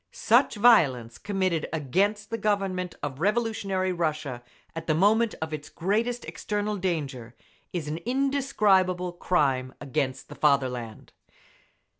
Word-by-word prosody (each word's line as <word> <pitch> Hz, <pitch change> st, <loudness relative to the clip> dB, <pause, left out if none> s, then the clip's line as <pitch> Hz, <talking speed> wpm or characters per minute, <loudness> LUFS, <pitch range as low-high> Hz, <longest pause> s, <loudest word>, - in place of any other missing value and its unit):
Such -, -, +3 dB
violence 135 Hz, -, +4 dB
committed 185 Hz, -5 st, -1 dB
against 195 Hz, -, 0 dB
the 230 Hz, -, -1 dB
Government 195 Hz, -3 st, -1 dB
of 140 Hz, -2 st, -4 dB
revolutionary 200 Hz, -2 st, 0 dB
Russia 155 Hz, -7 st, -2 dB, 0.3 s
at 165 Hz, -, -6 dB
the 155 Hz, -, +2 dB
moment 215 Hz, +6 st, +3 dB
of 160 Hz, 0 st, -5 dB
its 150 Hz, -1 st, -6 dB
greatest 225 Hz, +7 st, -1 dB
external 210 Hz, 0 st, -3 dB
danger, 140 Hz, -10 st, -3 dB, 0.4 s
is 170 Hz, -4 st, -4 dB
an 150 Hz, +2 st, -3 dB
indescribable 215 Hz, -9 st, +1 dB
crime 135 Hz, -8 st, 0 dB
against 135 Hz, -1 st, -2 dB
the -, -, -10 dB
fatherland. 130 Hz, -7 st, 0 dB
180 Hz, 120 wpm, -27 LUFS, 145-205 Hz, 0.4 s, violence